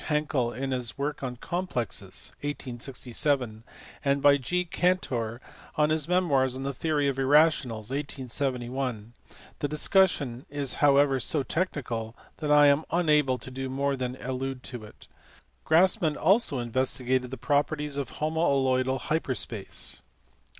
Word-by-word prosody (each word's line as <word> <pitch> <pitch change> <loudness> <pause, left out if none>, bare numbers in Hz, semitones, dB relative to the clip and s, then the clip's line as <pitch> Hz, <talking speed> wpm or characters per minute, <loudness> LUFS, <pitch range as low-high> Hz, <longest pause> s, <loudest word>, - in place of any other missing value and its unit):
Hankel 150 -5 0
in 135 +2 -4
his 125 -2 -2
work 145 +2 -3
on 125 -2 -4
complexes, 150 - -3
1867, 125 -3 -2 0.4
and 140 0 +2
by 145 0 +6
G. 180 +7 -1
Cantor 130 -11 0 0.4
in 150 0 +3
his 155 -1 0
memoirs 145 -8 +2
on 135 - -5
the 140 0 -2
theory 150 +1 0
of 135 -1 -1
irrationals, 135 -6 +3
1871; 130 -4 -3 0.5
the 145 - 0
discussion 150 -5 +2
is 140 -2 0
however 140 -2 +5
so 145 +2 +1
technical 120 -10 -2 0.2
that 150 -2 -2
I 150 0 +7
am 140 +2 +4
unable 150 -6 +2
to 130 - -7
do 130 0 -4
more 140 +1 0
than 125 -1 -3
allude 130 0 -4
to 120 -3 -6
it. 105 - -13 0.6
Grassmann 170 -1 +3
also 195 - +3
investigated 125 +1 0
the 130 - -6
properties 145 +3 0
of 140 -4 -4
homaloidal 135 -5 +1
hyper 155 -4 -1
space. 110 -5 -2
135 Hz, 135 wpm, -27 LUFS, 125-150 Hz, 0.6 s, I